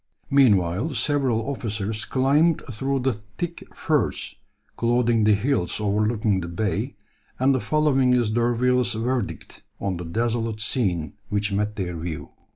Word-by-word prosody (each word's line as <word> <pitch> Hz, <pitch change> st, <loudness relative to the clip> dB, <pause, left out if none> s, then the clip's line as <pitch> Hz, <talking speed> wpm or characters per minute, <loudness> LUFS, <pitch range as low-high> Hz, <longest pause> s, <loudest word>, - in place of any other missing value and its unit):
Meanwhile 110 Hz, -, +3 dB
several 130 Hz, -3 st, +1 dB
officers 110 Hz, -5 st, -3 dB
climbed 145 Hz, +5 st, +2 dB
through 135 Hz, +4 st, -1 dB
the 130 Hz, 0 st, +1 dB
thick 110 Hz, -, -7 dB
furze 150 Hz, -, 0 dB, 0.4 s
clothing 120 Hz, -2 st, +2 dB
the 105 Hz, -1 st, +5 dB
hills 105 Hz, -5 st, 0 dB
overlooking 105 Hz, -1 st, +1 dB
the 85 Hz, -, -5 dB
bay, 95 Hz, +4 st, -2 dB, 0.4 s
and 135 Hz, +2 st, +3 dB
the 130 Hz, -, +1 dB
following 140 Hz, -3 st, +2 dB
is 120 Hz, -3 st, +2 dB
D'Urville's 120 Hz, +1 st, +2 dB
verdict 120 Hz, +2 st, -3 dB, 0.2 s
on 95 Hz, -3 st, -2 dB
the 85 Hz, -, -6 dB
desolate 115 Hz, +4 st, -1 dB
scene 95 Hz, -, -1 dB, 0.2 s
which 105 Hz, 0 st, 0 dB
met 105 Hz, +1 st, -1 dB
their 90 Hz, -5 st, -3 dB
view. 80 Hz, -1 st, -5 dB
115 Hz, 135 wpm, -24 LUFS, 105-130 Hz, 0.4 s, the